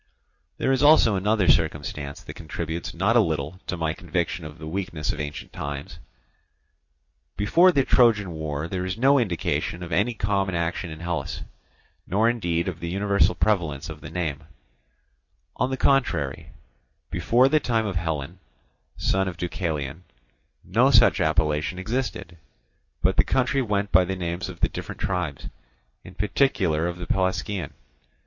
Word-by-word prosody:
There 135 - +1
is 135 -1 +2
also 145 -8 +6
another 100 0 +1
circumstance 75 -4 0
that - - -8
contributes 80 +1 -5
not 100 +7 +1
a - - +7
little 80 -3 -1
to 90 - -2
my 80 -1 -1
conviction 85 -2 -3
of 75 0 -9
the 80 - -9
weakness 80 -2 -3
of - - -7
ancient 75 -1 -6
times. 70 0 -6 1.4
Before 170 - +5
the 140 -6 +2
Trojan 110 -7 +4
war 80 -1 -4
there 90 +1 -3
is 95 +2 -3
no 135 +4 +5
indication 90 -4 -1
of 85 - -8
any 105 +8 +1
common 100 -3 0
action 85 +2 -2
in 80 0 -9
Hellas, 85 -1 -3 0.6
nor 105 +6 +2
indeed 85 -8 0
of 90 -3 -4
the 85 - -4
universal 100 +2 +2
prevalence 80 -7 0
of 75 -1 -8
the 75 - -8
name; 80 -3 -3 1.1
on - - +1
the 130 - -2
contrary, 85 - +1 0.6
before 115 +9 +3
the 155 +3 +3
time 115 -5 0
of 100 -3 -3
Hellen, 80 +1 -3 0.6
son 95 0 +1
of 90 -2 -5
Deucalion, 80 -3 -3 0.6
no - - +3
such - - +5
appellation 75 +2 +1
existed, 100 -4 -3 0.7
but - - +2
the - - +6
country 130 +1 +1
went 105 -4 -1
by 95 +1 +6
the 95 +1 -3
names 85 0 -3
of 90 - -10
the - - +4
different - - -7
tribes, 90 -8 -2 0.6
in 90 - -12
particular 95 - +1
of 85 0 -4
the 90 - -6
Pelasgian. 95 -2 -1
90 Hz, 155 wpm, -25 LUFS, 80-105 Hz, 1.4 s, a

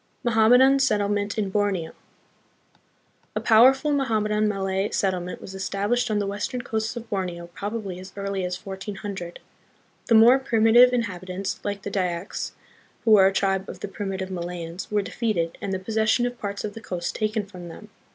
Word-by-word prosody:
Mohammedan 245 +4 +5
Settlement 205 -4 +1
in 200 -3 -1
Borneo. 195 -5 0 1.4
A - - +1
powerful 265 +6 +5
Mohammedan 215 -6 +1
Malay 195 -1 -1
settlement 180 -2 -1
was 190 - -9
established 200 +5 -1
on 215 - +1
the 205 - 0
western 205 +5 -3
coasts 220 +1 -2
of 235 -1 -7
Borneo 180 -4 -3
probably 205 -3 -5
as 185 +1 -10
early 200 -1 -3
as 180 0 -4
1400. 195 -2 -6 0.7
The 230 - +4
more 235 +4 +7
primitive 240 0 +5
inhabitants, 190 -5 -3
like 200 -1 -4
the - - -5
Dyaks, 180 -1 -2 0.5
who 225 - +4
were 195 -3 +8
a - - +2
tribe 195 0 0
of - - -9
the - - -3
primitive 195 -1 -4
Malayans, 175 0 -5
were 210 -1 +1
defeated, 195 -7 -2
and 200 - -3
the 190 - 0
possession 220 +4 +1
of 245 0 -4
parts 200 -1 -4
of 205 - -4
the 225 - -9
coast 180 -5 -4
taken 215 -1 -1
from 180 -3 -10
them. 210 +6 -11
205 Hz, 165 wpm, -24 LUFS, 190-220 Hz, 1.4 s, were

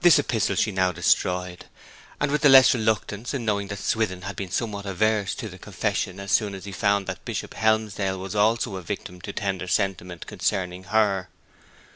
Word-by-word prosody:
This 175 -3 +8
epistle 110 -8 0
she 110 - +1
now 95 -1 +2
destroyed 90 +1 0 0.5
and 140 -1 0
with 150 - +1
the 145 - +6
less 135 0 +8
reluctance 110 +1 -1
in 120 -4 -3
knowing 100 -2 0
that 100 0 -5
Swithin 95 -3 -1
had 100 +1 -5
been 95 -2 -5
somewhat 100 0 -3
averse 105 +1 +1
to 120 - -5
the 95 -2 -11
confession 100 -1 -2
as 100 -1 -5
soon 100 -1 +2
as 95 - -9
he 100 - -6
found 100 0 +1
that - - -6
Bishop - - -5
Helmsdale 110 -3 0
was 95 0 -6
also 110 0 +1
a - - -6
victim 90 +1 -6
to 100 - -6
tender 95 -3 -3
sentiment 90 -2 -1
concerning 90 0 -2
her. 100 -3 +1
100 Hz, 190 wpm, -25 LUFS, 95-110 Hz, 0.5 s, This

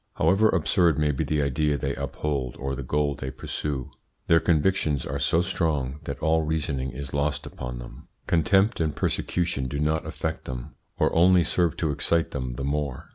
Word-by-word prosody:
However 110 +3 +4
absurd 85 -1 +3
may 75 -1 +2
be 65 - -1
the 75 -1 0
idea 75 +2 +1
they 70 0 -2
uphold 70 -5 -3
or 70 0 -3
the 70 - -5
goal 75 +2 0
they 65 0 -5
pursue, 65 0 -4 0.3
their 80 - +5
convictions 80 -5 +1
are - - -3
so 85 +2 +2
strong 75 -6 -1
that 70 - -4
all 80 0 +3
reasoning 75 -4 -1
is 65 +1 -7
lost 70 0 0
upon 60 0 -6
them. - - -10 0.2
Contempt 95 +6 +3
and 80 -2 0
persecution 80 -7 -1
do 70 - -4
not 80 +1 0
affect 80 0 -4
them, 60 -2 -6 0.2
or - - +2
only 90 +1 +5
serve 85 -1 +1
to 80 -3 0
excite 80 +3 +1
them 65 -3 -4
the 70 - -4
more. 70 -2 -2
75 Hz, 185 wpm, -26 LUFS, 70-80 Hz, 0.3 s, their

